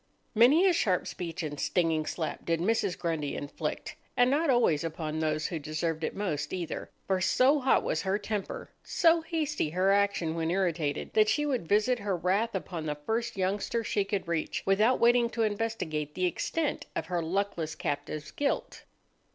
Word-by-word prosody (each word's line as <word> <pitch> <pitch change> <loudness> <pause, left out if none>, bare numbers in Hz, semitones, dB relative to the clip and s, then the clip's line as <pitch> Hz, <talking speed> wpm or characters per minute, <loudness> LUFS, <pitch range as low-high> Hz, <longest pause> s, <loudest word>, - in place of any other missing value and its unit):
Many 260 - +6
a 375 - +5
sharp 185 - +1
speech 170 0 -5
and 145 -2 -5
stinging 165 -3 +1
slap 160 - -3
did 165 -1 0
Mrs. 195 0 +1
Grundy 160 -4 -2
inflict—and 245 - -2
not 300 +2 +2
always 235 - +3
upon 160 -1 -3
those 155 -1 0
who 165 - -2
deserved 160 +2 -2
it - - -2
most, 150 -8 -2
either; 175 -3 -4 0.2
for 190 -1 0
so 255 +10 +4
hot 265 -1 +3
was - - -1
her 190 +1 0
temper, 205 -1 -4
so 335 -1 +3
hasty 310 - -1
her 185 +4 +2
action 200 -5 +2
when 165 0 -1
irritated, 170 -5 -1
that 215 0 +4
she 295 +6 +1
would 255 - -1
visit 215 +6 +3
her 200 -3 -1
wrath 195 +6 0
upon 165 -3 -4
the 150 - -1
first 230 -1 -1
youngster 200 +5 -1
she 205 -1 0
could 195 -2 -3
reach, 170 -2 -2
without 215 +6 +3
waiting 240 0 +4
to 230 -1 -1
investigate 205 -9 -2
the 185 - +1
extent 300 - -1
of - - -2
her 175 -1 -1
luckless 170 -2 -2
captive's 145 +1 -4
guilt. 285 -1 -2
190 Hz, 175 wpm, -29 LUFS, 160-230 Hz, 0.2 s, Many